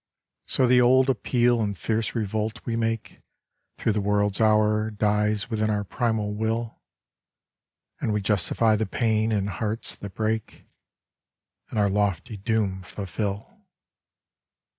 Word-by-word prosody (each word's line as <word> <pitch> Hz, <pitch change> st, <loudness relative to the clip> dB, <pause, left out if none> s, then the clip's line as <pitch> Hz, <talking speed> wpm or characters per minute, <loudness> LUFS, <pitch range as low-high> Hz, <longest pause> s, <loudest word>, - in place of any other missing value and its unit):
So 130 Hz, -, +2 dB
the 125 Hz, 0 st, +5 dB
old 130 Hz, +2 st, +5 dB
appeal 120 Hz, -2 st, +2 dB
and 100 Hz, -3 st, -2 dB
fierce 110 Hz, +3 st, -1 dB
revolt 110 Hz, +1 st, -2 dB
we 115 Hz, -, -1 dB
make 115 Hz, -1 st, -2 dB, 0.6 s
Through -, -, +1 dB
the 105 Hz, 0 st, 0 dB
world's 105 Hz, 0 st, +1 dB
hour 110 Hz, 0 st, +3 dB
dies 105 Hz, 0 st, 0 dB
within 110 Hz, -1 st, 0 dB
our 105 Hz, -1 st, 0 dB
primal 110 Hz, 0 st, -1 dB
will; 110 Hz, +2 st, -2 dB, 1.2 s
And -, -, -1 dB
we 105 Hz, -, +1 dB
justify 105 Hz, +2 st, +2 dB
the 110 Hz, 0 st, -1 dB
pain 110 Hz, 0 st, +1 dB
and 100 Hz, -2 st, 0 dB
hearts 105 Hz, +4 st, -3 dB
that 100 Hz, -3 st, -9 dB
break, 110 Hz, 0 st, -2 dB, 1.0 s
And -, -, -5 dB
our 105 Hz, -1 st, +4 dB
lofty 100 Hz, 0 st, -1 dB
doom 100 Hz, -2 st, -1 dB
fulfil. 100 Hz, +2 st, -5 dB
110 Hz, 130 wpm, -25 LUFS, 105-115 Hz, 1.2 s, the